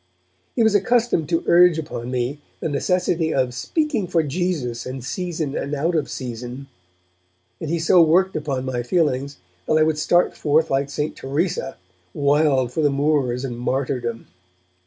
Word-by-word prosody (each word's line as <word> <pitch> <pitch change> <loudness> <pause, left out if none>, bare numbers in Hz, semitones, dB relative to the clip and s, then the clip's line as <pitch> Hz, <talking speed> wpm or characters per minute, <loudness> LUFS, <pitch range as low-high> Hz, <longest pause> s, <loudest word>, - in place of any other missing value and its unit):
He 235 - +3
was 220 -1 +4
accustomed 205 -5 +2
to 165 -1 +1
urge 175 -1 +6
upon 150 -6 -5
me 125 +3 -2 0.2
the - - -2
necessity 170 +1 0
of 130 -3 0
'speaking 235 - -1
for 170 -2 +1
Jesus 145 -7 -2
in 130 +1 -5
season 160 0 -3
and 145 +2 -2
out 160 +5 0
of 155 -4 0
season', 125 +1 -6 0.9
and 160 - -5
he 170 - 0
so 170 +2 +5
worked 180 +4 +3
upon 140 -4 -2
my 125 -2 -2
feelings 140 0 0 0.3
that 155 - +3
I 155 - +5
would 155 -1 +1
start 175 +3 +2
forth 155 +1 +1
like 135 +1 +1
St. 150 +2 -3
Teresa, 160 - -2 0.4
wild 140 -3 +2
for 160 - -1
the 145 - +3
Moors 140 -3 0
and 120 -2 -5
martyrdom. 125 -2 -2
150 Hz, 160 wpm, -22 LUFS, 130-170 Hz, 0.9 s, urge